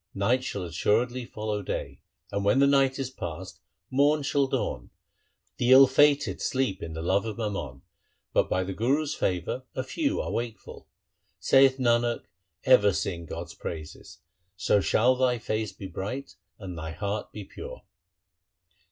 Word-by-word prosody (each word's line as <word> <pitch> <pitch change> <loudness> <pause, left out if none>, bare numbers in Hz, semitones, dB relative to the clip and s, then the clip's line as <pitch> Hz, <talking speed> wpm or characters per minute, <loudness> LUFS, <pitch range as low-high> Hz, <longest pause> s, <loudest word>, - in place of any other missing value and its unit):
Night 120 +6 +1
shall 100 -7 -4
assuredly 115 +8 0
follow 105 -2 -4
day. 70 -7 -5 0.3
And 100 - -2
when 100 +6 +3
the 140 - +5
night 135 -1 +3
is 135 -2 -3
passed, 85 -11 -7 0.3
morn 145 +3 +3
shall 140 0 +1
dawn. 60 - -3 0.7
The 120 +1 +2
ill 135 +1 +10
fated 145 +2 +3
sleep 130 -8 -1
in 80 -1 -6
the 80 0 -5
love 95 +3 +2
of 110 - -5
mammon, 85 - -4 0.5
But - - +2
by 95 - +1
the 95 +1 -4
Guru's 140 +9 0
favour 90 - -2
a 130 - -1
few 290 - -1
are - - -3
wakeful. 115 -2 -6 0.5
Saith 135 -1 +5
Nanak, 120 -2 +1 0.4
ever 105 -6 +6
sing 85 -3 -3
God's 85 +2 -6
praises, 80 -2 -8 0.4
So 100 +1 +2
shall 115 +9 +3
thy 125 -1 +2
face 110 -2 -2
be 100 - -10
bright 100 +9 -5 0.2
and 95 -3 -7
thy 80 -1 -6
heart 100 +4 -4
be 105 - -7
pure. - - -10
110 Hz, 155 wpm, -27 LUFS, 95-130 Hz, 0.7 s, ill